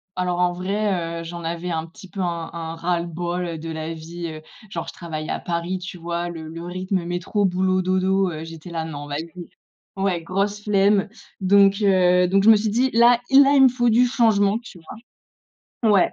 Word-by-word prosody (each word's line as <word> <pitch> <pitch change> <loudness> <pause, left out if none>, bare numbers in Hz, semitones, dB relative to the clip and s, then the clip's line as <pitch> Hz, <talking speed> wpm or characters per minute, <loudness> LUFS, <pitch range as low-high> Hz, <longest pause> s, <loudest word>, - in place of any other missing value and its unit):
alors 180 -1 -1
en 180 0 +2
vrai, 180 -3 -2
heu, - - -7
j'en 170 +1 -7
avais 170 +2 -3
un 160 0 -3
petit 180 +3 -14
peu 195 - -5
un 170 -2 -3
un 165 -1 -5
ras-le-bol, 175 +1 -2
heu, 170 -2 -4
de 165 +1 -7
la 160 0 -4
vie, 170 +2 -7
heu, 155 -1 -8 0.3
genre 170 -3 -5
je - - -7
travaille 155 -2 -6
à - - -2
Paris, 170 +2 -3
tu 180 +1 -8
vois? 170 0 -3
Le 165 -2 -7
le 165 +1 -8
rythme 185 +1 -3
métro 175 +4 -2
boulot 185 0 +1
dodo, 185 +1 +1
heu, 155 -1 -6
j'étais 165 +1 -10
là: 165 -1 -3
«Non 145 -2 -7
vas-y». 165 +4 -6 0.5
Ouais 190 -3 0
grosse 200 +4 -2
flemme. 200 -1 +2 0.3
Donc, 195 +1 +4
heu, 180 -2 +4
donc 195 +1 +3
je 220 - +6
me 225 - +9
suis 215 +1 0
dit: 245 +5 +2
«Là, 235 +1 +6
i 270 - +7
là 280 0 +5
il 270 - +7
me - - +9
faut 240 -1 +1
du 235 +3 +4
changement», 220 -4 +2
tu 185 - -12 1.0
vois? 225 - +4
Ouais, 195 -3 +3
180 Hz, 210 wpm, -22 LUFS, 170-200 Hz, 1.0 s, me